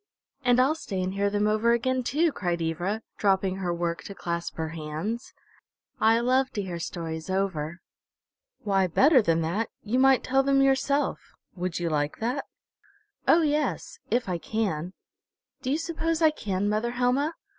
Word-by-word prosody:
"And 245 -1 +4
I'll 265 +4 +4
stay 205 -11 -5
and 185 +1 -2
hear 200 +1 +1
them 205 +1 0
over 215 +2 +3
again 255 +2 +1
too!" 305 +7 +1
cried 175 -8 -2
Ivra, 175 +7 -2 0.2
dropping 190 -2 +2
her 180 -2 -2
work 170 -1 -2
to 200 - -7
clasp 170 -1 -4
her 160 -1 -3
hands. 165 +9 -4 0.7
"I 225 +1 +4
love 260 +2 +2
to 205 - -2
hear 175 -3 -5
stories 165 0 -5
over." 180 -4 -2 0.8
"Why, 195 -2 +2
better 265 - +5
than 165 -5 +1
that, 200 +8 -1
you 230 +5 0
might 265 -1 +5
tell 270 +1 +3
them 275 0 +3
yourself. 275 +2 +2 0.4
Would 180 -1 -3
you 170 -2 -1
like 145 -1 -1
that?" 250 +5 -2 0.8
"Oh, 335 - +6
yes 305 +10 -1
if 240 -1 +1
I 180 -2 -2
can. 185 -5 -2 0.7
Do 260 - -3
you 285 - +2
suppose 330 0 -1
I 320 -2 +5
can, 205 -8 -2
mother 215 +3 0
Helma? 255 +6 +1
210 Hz, 165 wpm, -27 LUFS, 175-260 Hz, 0.8 s, Oh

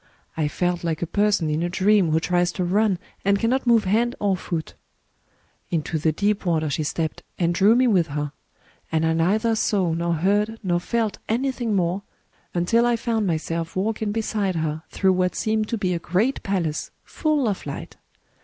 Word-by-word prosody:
I 155 -2 0
felt 175 +3 -1
like 165 -1 -1
a - - +1
person 205 -1 +1
in 155 +2 0
a 175 - 0
dream 190 0 +3
who 155 +1 +3
tries 175 +1 +1
to 185 - -2
run, 200 +2 +2 0.3
and 200 0 +3
cannot 245 +5 0
move 230 -2 +5
hand 230 +6 +1
or 200 -2 +2
foot. 170 -3 -4 1.0
Into 160 -1 -1
the 160 +1 +2
deep 205 +5 0
water 160 -4 0
she 155 - -1
stepped, 160 +1 -2 0.2
and 170 -1 +1
drew 200 +5 +5
me 255 +1 +4
with 185 -8 +3
her; 145 -1 -3 0.6
and 160 0 +1
I 160 - +2
neither 210 +8 +2
saw 190 -6 +1
nor 170 +1 0
heard 205 +6 +1
nor 175 -2 +1
felt 225 +3 -1
anything 240 -2 0
more 180 +1 0 0.5
until 180 +7 +3
I 240 - +3
found 225 -3 -1
myself 165 0 -2
walking 215 +2 -1
beside 210 -3 -1
her 155 -1 -2
through 190 -1 +2
what 180 0 0
seemed 215 0 0
to 230 - -2
be 185 -3 0
a 170 - -1
great 195 - 0
palace, 170 -6 -2
full 300 -5 0
of 200 -3 -2
light. 140 - -7
185 Hz, 185 wpm, -23 LUFS, 165-215 Hz, 1.0 s, move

